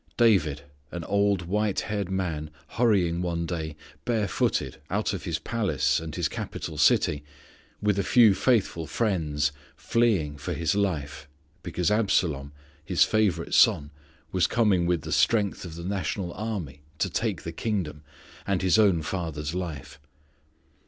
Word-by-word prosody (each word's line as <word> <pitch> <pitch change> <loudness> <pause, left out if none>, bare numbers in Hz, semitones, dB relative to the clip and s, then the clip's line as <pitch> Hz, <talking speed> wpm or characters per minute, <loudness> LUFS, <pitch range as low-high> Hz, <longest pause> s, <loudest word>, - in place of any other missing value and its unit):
David, 80 - +3 0.3
an 85 -1 -5
old 100 0 +1
white 105 +3 0
haired 100 -3 -3
man, 85 -5 -2 0.2
hurrying 95 -7 +2
one 85 -1 -2
day, 80 -3 -4 0.3
barefooted, 110 -6 0
out - - 0
of - - -5
his 85 -2 -1
palace, 80 - 0
and 80 -2 -7
his - - 0
capital - - -6
city, 75 -1 +3 0.6
with 105 -1 +2
a - - +1
few 115 +1 +6
faithful 95 -8 +1
friends, 75 -9 0 0.2
fleeing 95 -12 +1
for - - -3
his 85 -1 0
life, 75 -9 -2 0.3
because 85 0 -1
Absalom 85 -10 +1 0.3
his - - +3
favourite 100 -7 +1
son 75 0 +4 0.4
was 90 -2 +2
coming 100 -7 +2
with 85 -2 +1
the 80 - -6
strength 95 +7 +2
of 80 -2 -8
the 85 - -7
national 95 -1 -2
army 95 -10 -5 0.2
to - - +1
take - - -2
the 85 - -4
kingdom, 85 -6 -3 0.5
and 95 -2 0
his 95 +4 +4
own 95 -7 +4
father's 80 -3 -3
life. 75 -6 -5
90 Hz, 145 wpm, -26 LUFS, 80-100 Hz, 0.6 s, few